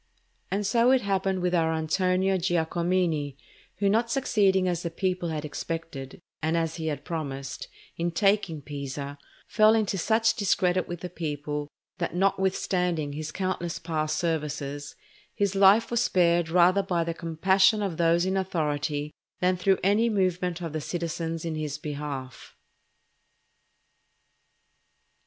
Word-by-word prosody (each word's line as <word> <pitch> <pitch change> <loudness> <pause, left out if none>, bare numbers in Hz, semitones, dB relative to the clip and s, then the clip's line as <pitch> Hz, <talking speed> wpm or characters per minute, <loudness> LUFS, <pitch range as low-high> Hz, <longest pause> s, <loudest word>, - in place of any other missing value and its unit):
And 200 +1 -1
so 235 +4 +3
it 260 -1 +4
happened 190 -2 0
with 180 0 +1
our 165 -2 +2
Antonio 185 +4 +1
Giacomini, 170 -4 0 0.4
who 200 +2 0
not 225 +4 +2
succeeding 200 -8 +2
as 175 -1 -1
the 170 - -3
people 180 0 -2
had 155 -1 -3
expected, 150 -3 -6 0.2
and 160 +2 +1
as 165 0 -1
he 160 -1 -3
had 145 -2 -3
promised, 140 -6 -5 0.3
in 170 +1 0
taking 180 -4 +1
Pisa, 140 0 -6 0.3
fell 215 +1 +5
into 205 -3 0
such 225 +4 +3
discredit 185 -4 +1
with 175 -1 -6
the 180 - -5
people, 150 -2 -4 0.3
that 170 -1 -2
notwithstanding 180 -4 0
his 155 +1 -5
countless 185 -3 -2
past 155 -3 -2
services, 150 -3 -3 0.4
his 200 -2 +1
life 200 +4 +5
was 235 -1 +2
spared 170 -4 +2
rather 180 +3 +5
by 180 -3 0
the 165 0 -3
compassion 190 +5 +2
of 185 -5 -3
those 170 +1 +3
in 190 +1 0
authority 150 -5 -1 0.3
than 180 0 +2
through 190 +1 +2
any 210 +5 +3
movement 180 -4 0
of 165 -3 -5
the 155 - -2
citizens 165 0 -3
in 165 - -2
his 150 -2 -3
behalf. 145 -3 -6
175 Hz, 140 wpm, -27 LUFS, 155-190 Hz, 0.4 s, fell